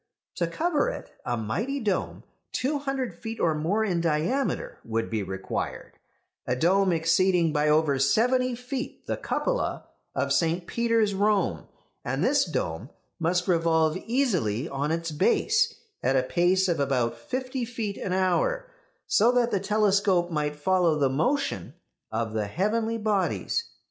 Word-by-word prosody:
To 170 - +1
cover 310 - 0
it, - - -7
a 120 -1 -1
mighty 210 - -2
dome, 210 -6 -2 0.3
two 285 +3 -1
hundred 270 -3 -2
feet 225 0 -7
or 165 - +2
more 175 +9 0
in 175 -5 0
diameter, 170 - -1
would 115 0 -2
be 110 -2 0
required; 95 0 -5 0.5
a 125 - +1
dome 185 +7 +3
exceeding 165 0 +3
by 150 0 +2
over 150 -3 +3
seventy 245 - +2
feet 255 +3 -6
the - - -1
cupola - - -2 0.3
of - - +1
St. 170 +1 +1
Peter's, 230 -1 +1
Rome; 195 - +1 0.4
and - - -1
this - - +3
dome 80 - -3 0.3
must 175 +2 +1
revolve 165 -2 +2
easily 185 - 0
on 140 0 -2
its 165 0 -2
base 430 - +2 0.3
at 135 - +1
a 130 - +3
pace 180 +7 +2
of 170 -4 0
about 125 -4 +1
fifty 255 - -4
feet 225 -4 -4
an 185 - -3
hour, - - +1 0.3
so 230 +4 +4
that 240 -1 +2
the 200 - +1
telescope 200 -3 +2
might 150 -2 -1
follow 170 +1 +2
the 140 -2 +2
motion 165 - -1 0.4
of 110 0 -2
the 110 -2 -1
heavenly 220 - 0
bodies. 215 - 0
185 Hz, 150 wpm, -26 LUFS, 150-230 Hz, 0.5 s, so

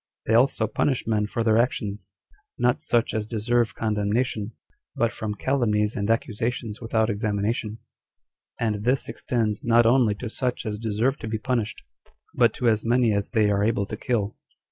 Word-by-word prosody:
They 110 - +1
also 120 -1 +3
punish 130 +4 0
men 105 -2 +1
for 115 +2 -2
their 110 0 +4
actions, 105 -4 -1 0.5
not 125 0 +1
such 120 -1 +1
as 110 -1 -2
deserve 120 +1 0
condemnation, 110 +1 -1 0.4
but 115 0 +1
from 105 -1 -4
calumnies 105 -4 +1
and 100 +1 -2
accusations 115 0 -2
without 110 -1 +1
examination; 105 +1 -2 0.8
and 105 -3 -1
this 130 +4 +1
extends 110 -4 -2
not 120 0 +4
only 120 -3 +4
to 120 +4 -6
such 125 +2 -3
as 105 -1 -3
deserve 115 +5 0
to - - -6
be 110 0 -2
punished, 115 -1 -2 0.5
but 120 -2 +4
to 125 - 0
as 110 -2 +2
many 120 -1 +3
as 100 -1 -1
they 110 -3 +2
are 100 0 +1
able 105 -2 +1
to - - -6
kill. 110 -4 -1
110 Hz, 165 wpm, -25 LUFS, 105-120 Hz, 0.8 s, their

